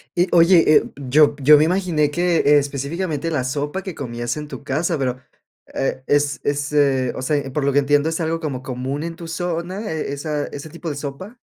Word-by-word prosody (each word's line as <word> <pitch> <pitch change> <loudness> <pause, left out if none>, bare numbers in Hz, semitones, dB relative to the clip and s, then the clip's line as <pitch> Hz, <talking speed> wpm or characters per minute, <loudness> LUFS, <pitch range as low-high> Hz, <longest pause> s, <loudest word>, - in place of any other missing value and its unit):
Y, 175 +1 +2
oye, 170 0 +6
eh, - - +6 0.3
yo 145 +2 +5
yo 150 +2 +7
me 150 - +4
imaginé, 165 -4 +1
que 170 -3 +3
específicamente, 150 +4 -3
la 135 -5 0
sopa 145 +7 -3
que 190 -4 -7
comías 120 0 -4
en 150 - -6
tu 145 - -9
casa. 155 +5 -1
Pero, 130 -1 -1 0.5
e 130 -1 -2
es 145 -2 +1
es, 145 0 -1
eh, 135 -4 +2
o - - -5
sea, 145 +1 +1
por 150 +2 -2
lo 140 - +1
que 145 - +5
entiendo, 145 +2 +2
¿es 165 - -3
algo 165 0 -1
como 145 -6 -4
común 130 +3 -4
en 165 0 -5
tu 170 -1 -9
zona, 175 +5 -4
eh, 155 -3 -3
esa 145 +1 -3
ese 145 +2 -8
tipo 170 +1 -7
de - - -5
sopa? 155 - -7
150 Hz, 210 wpm, -21 LUFS, 140-165 Hz, 0.5 s, yo